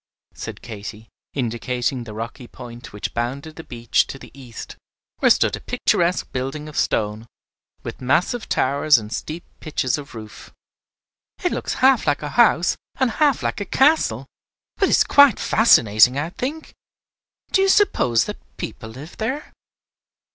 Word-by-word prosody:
said - - -8
Katy, 110 0 -8 0.3
indicating 125 0 -2
the 105 -2 -9
rocky 115 +3 -6
point 120 -1 -11
which 105 - -5
bounded 135 +6 -4
the 160 - -9
beach 120 -4 0
to - - -7
the - - -13
east, 125 -5 -10 0.4
where - - +4
stood - - +3
a - - -8
picturesque 175 +1 0
building 135 +4 -4
of 150 - -10
stone, 105 +2 -1 0.6
with - - -7
massive 175 - 0
towers 140 +2 +3
and 110 0 -6
steep 160 +7 -5 0.2
pitches 145 -3 -1
of 140 -3 -11
roof. 110 -1 -10 0.9
"It 355 - +1
looks - - -3
half 265 -9 +4
like 145 0 +1
a 150 - -3
house 215 -4 +4 0.2
and 260 -3 +1
half 290 0 +2
like - - -2
a - - 0
castle, 300 +9 +2 0.5
but 390 - +3
it - - +5
is - - +5
quite 285 -7 +6
fascinating, 125 - +5
I 155 +4 -2
think. 290 - -5 0.8
Do 385 - +3
you 390 - +3
suppose 125 - +3
that - - -6 0.2
people 110 - -6
live 135 +9 -11
there?" 260 +7 -4
140 Hz, 155 wpm, -22 LUFS, -, 0.9 s, quite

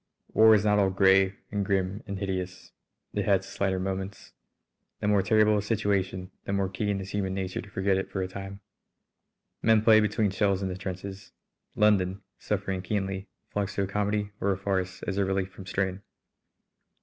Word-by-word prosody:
War 110 0 +7
is 105 0 +1
not 105 0 +4
all 100 -1 +4
grey 95 0 +4 0.2
and 100 -1 0
grim 95 +1 0
and 100 -1 -4
hideous. 95 -2 -4 0.4
It - - 0
has 95 -1 +3
its - - -11
lighter 95 -1 +2
moments. 95 +1 -4 0.7
The - - -2
more 105 -1 +4
terrible 105 +2 +4
a - - -1
situation 100 -3 -1
the 100 - -3
more 100 -1 +1
keen 100 +1 -1
is 95 0 -7
human 95 -2 -1
nature 95 -1 -3
to - - -13
forget 95 0 +1
it 95 - -3
for 95 - -2
a - - -2
time. 95 +1 -8 1.0
Men 110 -1 +4
play 110 -1 +7
between 105 -1 +1
shells 100 0 +1
in 95 - -1
the 90 - -4
trenches. 95 +1 -7 0.4
London, 100 -3 +2 0.2
suffering 95 -2 -2
keenly, 95 0 -2 0.2
flocks 100 -1 -2
to 100 - +1
a - - -2
comedy 105 +1 -1
or 100 - +2
a 95 - 0
farce 95 -1 -2
as 100 0 -2
a - - +3
relief 95 0 -1
from 95 0 -11
strain. 95 -1 -1
95 Hz, 185 wpm, -28 LUFS, 95-105 Hz, 1.0 s, War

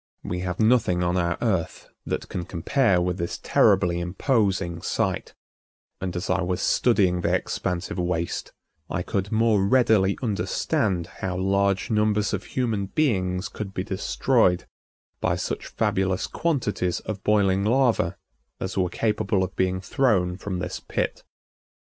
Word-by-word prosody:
We 90 - -3
have 90 -1 -3
nothing 110 -6 +3
on 90 +1 +1
our 85 -2 0
Earth 95 -8 -1 0.2
that - - -2
can 90 - -4
compare 95 - +1
with 90 +1 -1
this 85 - -3
terribly 90 -4 +3
imposing 95 -2 0
sight, - - -2 0.7
and 95 -1 -3
as 90 +3 -3
I 95 0 +1
was 90 +1 -1
studying 95 -6 +2
the - - +2
expansive 90 +1 -3
waste 85 -1 -2 0.4
I 90 - -2
could 100 +3 -2
more 110 -3 +3
readily 100 -3 +3
understand 100 -4 0 0.2
how 90 -1 -2
large 100 +1 +1
numbers 105 -1 +2
of 95 - -3
human 115 -6 -1
beings 95 -9 0
could 100 -2 -7
be 95 - -1
destroyed 95 0 +1 0.5
by - - +1
such - - -4
fabulous 95 0 0
quantities 110 - -1
of 105 -3 -6
boiling 100 -2 +3
lava 115 -6 +2 0.4
as 95 - -4
were 90 -2 +1
capable 105 -1 0
of 95 0 -5
being 95 0 0
thrown 95 -5 +1
from 95 0 -4
this 90 0 -4
pit. - - -3
95 Hz, 140 wpm, -25 LUFS, 90-105 Hz, 0.7 s, nothing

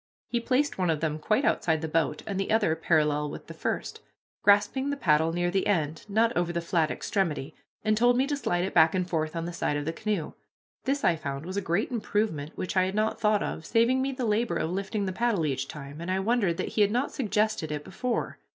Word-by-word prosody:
He 240 - 0
placed 255 +1 0
one 180 -2 +1
of 160 -2 +1
them 155 -1 -1
quite 215 - +1
outside 160 -2 +1
the - - -1
boat, 155 -2 0
and 195 -2 -3
the 195 - -2
other 215 -7 +3
parallel 150 -2 +1
with - - -8
the - - -9
first, - - -3 0.4
grasping 205 +7 +3
the 285 - -2
paddle 160 - +3
near 175 +1 0
the 190 +1 +1
end, 160 -6 0
not 225 +3 +2
over 175 0 +1
the 170 - -1
flat 170 -2 +1
extremity, 160 -6 -2 0.3
and 215 0 +2
told 245 +2 +4
me 260 - +3
to 290 +1 -1
slide 175 -11 0
it 190 - -3
back 160 +1 +5
and 180 -1 0
forth 155 -2 -2
on 165 0 -2
the 175 - -5
side 145 -3 -1
of 145 - -3
the 160 - -2
canoe. 205 -4 -2 0.5
This, 275 +1 0
I 170 - +4
found, 140 -2 -5
was 185 +2 -5
a 200 - 0
great 195 +5 0
improvement 210 -10 -2
which 185 - -3
I 185 -1 +4
had 190 +1 -3
not 215 +1 0
thought 210 -1 +3
of, 160 - -4
saving 235 +8 +2
me 270 +1 0
the 255 -2 -3
labor 215 -3 +1
of 165 0 -1
lifting 200 +2 -2
the 185 - -2
paddle 220 -6 +1
each 135 -2 -1
time, 145 +1 -8
and 170 - -5
I 190 +1 +1
wondered 200 -4 +1
that - - -2
he 215 - 0
had 205 - +5
not 245 +6 0
suggested 215 - 0
it 150 -1 -3
before. 250 +7 -3
185 Hz, 245 wpm, -28 LUFS, 160-220 Hz, 0.5 s, back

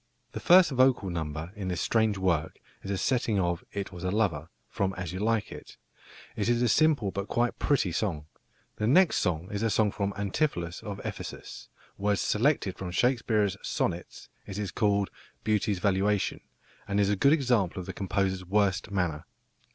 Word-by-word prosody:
The - - -5
first 180 -2 +6
vocal 130 -7 +3
number 80 0 -4
in 100 -3 -5
this 90 -1 -2
strange 110 -3 +1
work 85 -5 0 0.2
is 95 - -8
a 100 - -1
setting 115 0 +1
of 85 -1 -1
"It 100 -2 -4
was 90 -1 -9
a 90 - 0
lover," 90 -7 0 0.2
from 95 -3 -1
As 90 -2 -5
You 95 - -4
Like 110 0 0
It. - - -11 0.6
It 105 +2 -1
is 120 0 +2
a - - +3
simple 145 -7 +3
but 100 +2 -4
quite 120 0 0
pretty 135 -11 +1
song. 85 -4 -2 0.5
The 105 - 0
next 180 +8 +4 0.3
is 105 0 -3
a 115 - +1
song 105 -1 +2
for 100 0 -2
Antipholus 100 - -1
of 100 -2 -6
Ephesus, - - -7 0.3
words 100 0 +1
selected 110 -4 +1
from 95 - -4
Shakespeare's 105 -1 +1
Sonnets; 85 +1 -3 0.2
it 95 - -6
is 105 -3 -3
called 100 -2 +1 0.3
"Beauty's 105 -1 +1
valuation," 100 +1 +1 0.5
and 100 +1 0
is 100 0 +3
a - - +2
good 140 +8 +4
example 120 - +1
of 90 - -6
the - - -6
composer's 95 -1 -1
worst 95 0 +1
manner. 90 -6 -2
100 Hz, 175 wpm, -28 LUFS, 95-110 Hz, 0.6 s, first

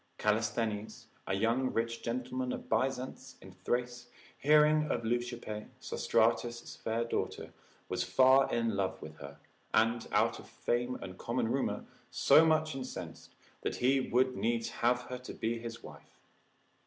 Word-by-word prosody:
Callisthenes 105 0 -1 0.2
a - - 0
rich 95 - -2
young 125 +3 +1 0.3
gentleman 125 +1 -2
of - - -7
Byzance 130 0 -2
in 95 - -12
Thrace, 120 +6 -3 0.3
hearing 150 +1 +5
of 115 - -1
Leucippe, 120 -2 -3
Sostratus' 120 +1 0
fair 115 +1 -1
daughter, 115 - -3 0.3
was 90 - -2
far 130 +8 +5
in 115 -2 0
love 95 -1 -1
with 75 0 -10
her, 70 0 -10 0.4
and, 115 +1 +2
out - - +2
of - - -13
fame 120 +1 -1
and 95 -1 -8
common 120 -1 -1
rumour, 135 +1 -1 0.2
so 160 - +6
much 155 -1 +2
incensed, 135 -1 -7 0.3
that - - -2
he 135 +2 +3
would 130 0 +1
needs 115 0 0
have 120 +1 +1
her 125 0 -6
to 125 - -9
be 115 +1 -2
his 115 0 -7
wife. - - -14
120 Hz, 145 wpm, -32 LUFS, 110-130 Hz, 0.4 s, so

